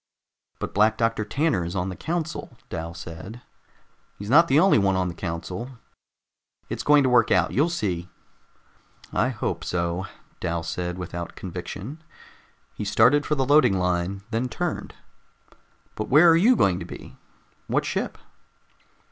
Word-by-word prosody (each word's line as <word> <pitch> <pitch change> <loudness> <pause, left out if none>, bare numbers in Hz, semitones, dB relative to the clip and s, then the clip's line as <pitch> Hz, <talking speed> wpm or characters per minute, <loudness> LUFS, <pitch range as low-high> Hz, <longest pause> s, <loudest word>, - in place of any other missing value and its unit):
"But - - -5
Black 110 +2 +3
Doctor 115 -1 +1
Tanner 140 - 0
is 85 +3 -5
on 90 0 -1
the 90 - -5
council," 165 - -4
Dal 85 -1 -5
said. 90 +8 -9 0.7
"He's 100 +3 -6
not 165 +4 +7
the 140 0 +4
only 190 - +5
one 95 -1 +2
on 90 -1 0
the - - -6
council. 90 +9 -5 0.9
It's - - -3
going 145 -1 +5
to 130 - +2
work 125 -1 +4
out. - - +3
You'll 150 +6 +2
see." 90 - -2 1.0
"I - - +2
hope - - -3
so," 85 +1 -2 0.3
Dal 85 -1 -2
said 90 +1 -4
without 85 -1 -6
conviction. 95 - -7 0.7
He - - -5
started 115 +8 +4
for 150 - +1
the 135 -2 0
loading 135 -8 +5
line, 90 +2 -1
then 120 +2 -1
turned. 175 +2 -4 1.0
"But 110 - -5
where 155 +5 +7
are - - +6
you 220 +10 +5
going 95 - +2
to - - -6
be? - - -11 0.5
What - - 0
ship?" - - -3
105 Hz, 155 wpm, -25 LUFS, 90-145 Hz, 1.0 s, not